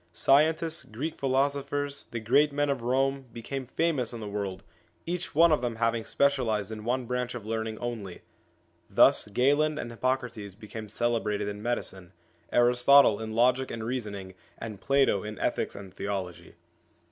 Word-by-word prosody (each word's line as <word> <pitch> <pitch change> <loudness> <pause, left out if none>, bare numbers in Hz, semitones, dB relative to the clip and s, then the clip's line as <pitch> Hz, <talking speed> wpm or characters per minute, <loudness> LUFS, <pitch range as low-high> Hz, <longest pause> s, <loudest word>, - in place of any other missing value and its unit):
Scientists, 155 - +3
Greek 145 +9 -5
philosophers, 140 +1 0
the 120 - -5
great 140 +7 +3
men 145 0 +1
of 135 -3 -2
Rome, 135 +2 0
became 130 +3 -6
famous 145 -4 0
in 120 - -6
the 105 - -6
world, 100 -2 -4 0.4
each 175 -2 -4
one 165 +2 +6
of 150 - +3
them 120 -2 -2
having 115 0 0
special 140 -3 +1
ised 105 -1 -1
in 110 -1 -6
one 125 +2 -1
branch 125 0 -2
of 115 -4 -7
learning 110 0 -3
only. 110 -7 -6 0.7
Thus - - +5
Galen 145 +8 +2
and 120 - -5
Hippocrates 115 -5 -2
became 110 0 -9
celebrated 110 -2 -1
in 105 0 -5
medicine, 95 -6 -4 0.4
Aristotle 125 -1 +5
in 110 0 -5
logic 125 +3 +3
and 115 -1 -5
reasoning, 105 -6 -4 0.2
and 110 -3 -7
Plato 135 -7 +3
in 105 -1 -6
ethics - - -1
and 95 -2 -10
theology. 95 -4 -5
120 Hz, 160 wpm, -28 LUFS, 105-135 Hz, 0.7 s, one